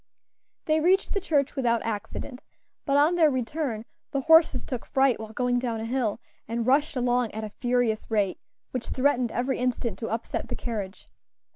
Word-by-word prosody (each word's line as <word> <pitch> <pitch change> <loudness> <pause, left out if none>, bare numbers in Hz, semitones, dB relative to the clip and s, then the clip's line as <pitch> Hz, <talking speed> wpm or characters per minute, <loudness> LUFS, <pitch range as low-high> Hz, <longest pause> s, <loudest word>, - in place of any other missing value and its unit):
They 310 0 +3
reached 370 +5 +3
the 400 - -1
church 290 -5 +1
without 235 -4 +1
accident, 225 +4 -5 0.5
but 275 0 +3
on 300 +4 +5
their 330 -3 +5
return 255 -3 -2 0.2
the 275 -2 -1
horses 320 -3 +5
took 250 -3 -4
fright 265 -2 +2
while 220 -1 -7
going 245 +1 +1
down 235 -3 -2
a 220 - -4
hill, 235 -3 -1 0.3
and 230 0 -2
rushed 285 +4 +2
along 245 -2 +1
at 220 +1 -4
a 215 - -5
furious 245 -3 0
rate, 205 -4 0 0.3
which 250 -2 -4
threatened 255 -3 +1
every 255 +3 -1
instant 250 -2 -1
to 225 - -4
upset 225 +1 -3
the - - -4
carriage. 210 -5 -5
250 Hz, 175 wpm, -26 LUFS, 230-280 Hz, 0.5 s, on